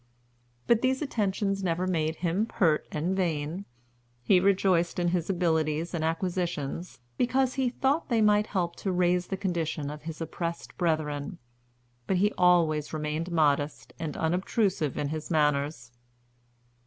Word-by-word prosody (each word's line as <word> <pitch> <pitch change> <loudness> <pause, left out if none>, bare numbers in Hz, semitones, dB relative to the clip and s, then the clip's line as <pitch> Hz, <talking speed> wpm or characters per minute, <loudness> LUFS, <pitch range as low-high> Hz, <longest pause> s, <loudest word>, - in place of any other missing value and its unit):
But 235 -1 +3
these 260 +2 +1
attentions 195 -6 -1
never 175 0 0
made 160 -3 0
him 190 +7 +1
pert 160 -9 +1
and 170 +5 -1
vain. 170 0 -2 0.6
He 185 +7 +5
rejoiced 185 -2 +2
in 175 -1 +1
his 175 -1 -1
abilities 160 -3 0
and 165 -2 -1
acquisitions, 170 -3 -2 0.2
because 255 +1 +2
he 265 -2 +1
thought 270 +6 0
they 235 -3 +2
might 210 0 +4
help 175 -4 -1
to 195 - -2
raise 180 0 +2
the 195 - -3
condition 165 -6 -2
of 150 0 -8
his 155 +1 -7
oppressed 170 +1 -5
brethren; 155 -1 -1 0.7
but 190 - +2
he 205 +3 +2
always 165 -4 +3
remained 155 +3 -2
modest 145 -6 +1
and 160 -3 -4
unobtrusive 180 - 0
in 145 - -1
his 155 0 -5
manners. 145 -5 0
170 Hz, 140 wpm, -28 LUFS, 155-190 Hz, 0.7 s, He